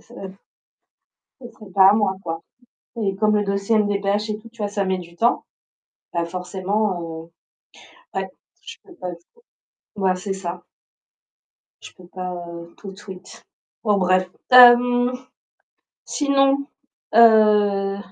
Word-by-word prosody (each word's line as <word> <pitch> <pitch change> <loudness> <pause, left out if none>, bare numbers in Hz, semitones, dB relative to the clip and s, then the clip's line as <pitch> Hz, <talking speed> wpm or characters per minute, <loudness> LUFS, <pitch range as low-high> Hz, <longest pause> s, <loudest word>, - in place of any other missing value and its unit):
ce 240 - -17 1.3
ce 245 - -10
serait 210 -3 -15
pas 190 +1 +6
à - - +5
moi 205 -3 0
quoi, 165 -2 -5 0.6
et 195 -2 -1
comme 215 +1 +1
le 210 - +1
dossier 200 +3 0
MDPH 205 0 -1
et 210 - -4
tout, 225 +2 -15
tu 230 - -26
vois? 210 -2 -2
Ça 200 -1 -2
met 190 0 -1
du 170 -1 -13
temps, 235 +7 +1 0.7
bah 170 0 -1
forcément, 185 +2 -3
heu, 165 0 -9 0.9
ouais, - - -5 0.3
je - - -11
peux 365 - -17
pas 180 - -6
trop 170 - -26 0.6
mouais, 190 -2 +1
c'est 195 +2 -5
ça. 180 -2 -7 1.2
Je - - -12
peux 180 - -17
pas, 180 0 -6
heu, 170 -1 -9
tout 195 - -10
de 190 - -15
suite. 190 -2 -12 0.4
Bon, 210 -3 +2
bref, 185 0 +1 0.2
hem, 245 0 +7 0.9
sinon, 275 -1 +1 0.5
heu 210 -3 +4
200 Hz, 140 wpm, -21 LUFS, 180-215 Hz, 1.3 s, hem